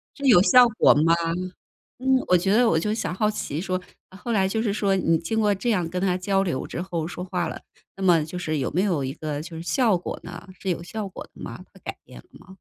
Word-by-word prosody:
这 280 Hz, -, -6 dB
有 210 Hz, -9 st, +7 dB
效 250 Hz, +3 st, +7 dB
果 -, -, +6 dB
吗？ 160 Hz, +3 st, +3 dB, 0.9 s
嗯， 265 Hz, 0 st, +2 dB
我 180 Hz, -, +5 dB
觉 190 Hz, +3 st, 0 dB
得 240 Hz, 0 st, +5 dB
我 160 Hz, -, +3 dB
就 210 Hz, +4 st, -1 dB
想 180 Hz, -6 st, -2 dB
好 210 Hz, +3 st, +1 dB
奇 160 Hz, -7 st, -4 dB
说， 185 Hz, -1 st, -2 dB, 0.3 s
后 200 Hz, +6 st, -6 dB
来 190 Hz, -3 st, +2 dB
就 220 Hz, +3 st, -1 dB
是 210 Hz, -3 st, 0 dB
说 200 Hz, -2 st, +1 dB
你 165 Hz, -3 st, +2 dB
经 195 Hz, +7 st, -2 dB
过 210 Hz, -1 st, +3 dB
这 240 Hz, +5 st, -2 dB
样 180 Hz, -7 st, +1 dB
跟 180 Hz, +1 st, -3 dB
他 185 Hz, -2 st, +1 dB
交 195 Hz, +1 st, +1 dB
流 170 Hz, -8 st, -2 dB
之 175 Hz, -, -5 dB
后 170 Hz, -3 st, -3 dB
说 180 Hz, +1 st, -6 dB
话 180 Hz, -3 st, -2 dB
了， -, -, -6 dB, 0.4 s
那 195 Hz, -, -6 dB
么 170 Hz, -4 st, +4 dB
就 180 Hz, +3 st, -7 dB
是 155 Hz, -3 st, -2 dB
有 130 Hz, -, -1 dB
没 180 Hz, -, +1 dB
有 175 Hz, -9 st, 0 dB
一 130 Hz, +1 st, -3 dB
个 150 Hz, -1 st, -4 dB
就 165 Hz, 0 st, -9 dB
是 165 Hz, -, -6 dB
效 220 Hz, -2 st, +2 dB
果 175 Hz, -, -6 dB
呢？ 175 Hz, +2 st, -9 dB
是 190 Hz, -, -4 dB
有 170 Hz, -, -1 dB
效 210 Hz, +2 st, -5 dB
果 190 Hz, -, -9 dB
的 -, -, -15 dB
吗？ -, -, -7 dB
他 -, -, -17 dB
改 -, -, -6 dB
变 -, -, -13 dB
了 -, -, -16 dB
吗？ -, -, -18 dB
185 Hz, 280 characters per minute, -24 LUFS, 170-210 Hz, 0.9 s, 有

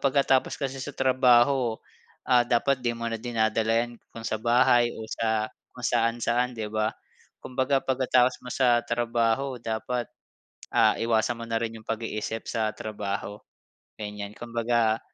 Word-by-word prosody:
pagkatapos 135 Hz, -1 st, +2 dB
kasi 135 Hz, -2 st, -3 dB
sa 145 Hz, 0 st, -6 dB
trabaho, 130 Hz, -1 st, +4 dB, 0.5 s
ah, 125 Hz, -1 st, +5 dB
dapat 130 Hz, +3 st, +2 dB
'di 120 Hz, -1 st, 0 dB
mo 115 Hz, 0 st, -4 dB
na 115 Hz, -, -3 dB
dinadala 115 Hz, -1 st, +1 dB
yan 120 Hz, -1 st, -13 dB, 0.2 s
kung 115 Hz, -, -8 dB
sa 110 Hz, -, -1 dB
bahay 120 Hz, +1 st, +4 dB
o -, -, -7 dB
sa 110 Hz, -1 st, 0 dB, 0.2 s
kung 125 Hz, -, -11 dB
saan-saan 120 Hz, +1 st, +1 dB
'di 110 Hz, -1 st, -4 dB
ba? 110 Hz, 0 st, 0 dB, 0.5 s
Kumbaga 130 Hz, +1 st, 0 dB
pagkatapos 130 Hz, -1 st, +2 dB
mo -, -, -7 dB
sa 120 Hz, -3 st, +3 dB
trabaho 120 Hz, +2 st, 0 dB
dapat, 120 Hz, +2 st, -2 dB, 0.7 s
ah, -, -, +5 dB
iwasan 115 Hz, 0 st, +1 dB
mo -, -, -4 dB
na 115 Hz, 0 st, 0 dB
rin 115 Hz, -1 st, -3 dB
yung 110 Hz, -, -16 dB
pag-iisip 115 Hz, 0 st, -3 dB
sa 110 Hz, -2 st, 0 dB
trabaho, 105 Hz, -1 st, -5 dB, 0.6 s
ganyan. 105 Hz, -1 st, -6 dB
Kumbaga 115 Hz, -1 st, 0 dB
120 Hz, 145 wpm, -26 LUFS, 110-125 Hz, 0.7 s, ah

